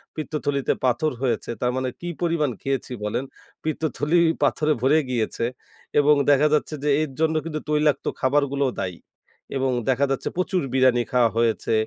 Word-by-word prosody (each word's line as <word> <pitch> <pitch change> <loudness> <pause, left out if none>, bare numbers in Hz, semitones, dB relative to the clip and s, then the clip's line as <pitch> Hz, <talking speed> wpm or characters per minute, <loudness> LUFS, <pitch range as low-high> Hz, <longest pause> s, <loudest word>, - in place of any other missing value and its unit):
পিত্তথলিতে 145 -3 -1
পাথর 130 +5 +1
হয়েছে। 120 -4 -1
তার 125 0 +2
মানে 130 0 -1
কি 175 - -4
পরিমাণ 165 -4 +1
খেয়েছি 135 -1 -2
বলেন? 105 +5 -1 0.4
পিত্তথলি 155 +1 0 0.2
পাথরে 150 +2 +2
ভরে 135 +5 +4
গিয়েছে। 115 -1 -1 0.5
এবং 145 +1 +5 0.2
দেখা 145 +1 +5
যাচ্ছে 150 - +1
যে 150 - +1
এর 155 -3 -2
জন্য 160 0 +2
কিন্তু 155 -2 -3
তৈলাক্ত 150 -2 +2
খাবারগুলোও 140 0 +1
দায়ী। 90 -3 -4 0.6
এবং 135 0 +1 0.2
দেখা 130 +2 +3
যাচ্ছে 135 - -1
প্রচুর 185 0 0
বিরানি 130 -2 +4
খাওয়া 125 -2 +4
হয়েছে, 115 -1 +1
140 Hz, 150 wpm, -23 LUFS, 130-155 Hz, 0.6 s, এবং